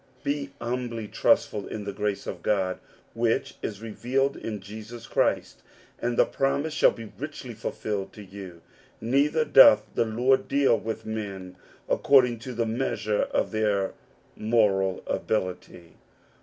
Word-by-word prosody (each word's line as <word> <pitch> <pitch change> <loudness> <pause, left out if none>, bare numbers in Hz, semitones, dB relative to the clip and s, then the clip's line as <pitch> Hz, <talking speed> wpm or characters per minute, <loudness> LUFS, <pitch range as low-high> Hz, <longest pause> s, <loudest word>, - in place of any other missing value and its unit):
Be 140 0 -2
humbly 120 -2 -3
trustful 105 0 +1
in 105 - -5
the 100 0 -5
grace 105 0 -2
of 90 - -6
God 95 -2 0 0.3
which 115 0 0
is 105 0 -5
revealed 130 +5 0
in 105 -2 -5
Jesus 110 +4 -9
Christ, - - 0 0.4
and 120 0 -1
the - - +6
promise 140 +3 -1
shall - - +5
be 115 -2 -8
richly 140 -4 -6
fulfilled 105 -2 -4
to 105 - -10
you. 95 -3 -10 0.4
Neither 140 +7 +2
doth 135 -7 +8
the 115 - +1
Lord 125 +4 +2
deal 140 -3 +3
with 115 0 -5
men 100 -4 -5 0.3
according 125 -4 +4
to 125 +2 -7
the 115 0 0
measure 110 -3 -1
of - - 0
their 105 -3 0 0.4
moral 100 -4 +2
ability. 90 -4 -3
110 Hz, 140 wpm, -26 LUFS, 100-125 Hz, 0.4 s, doth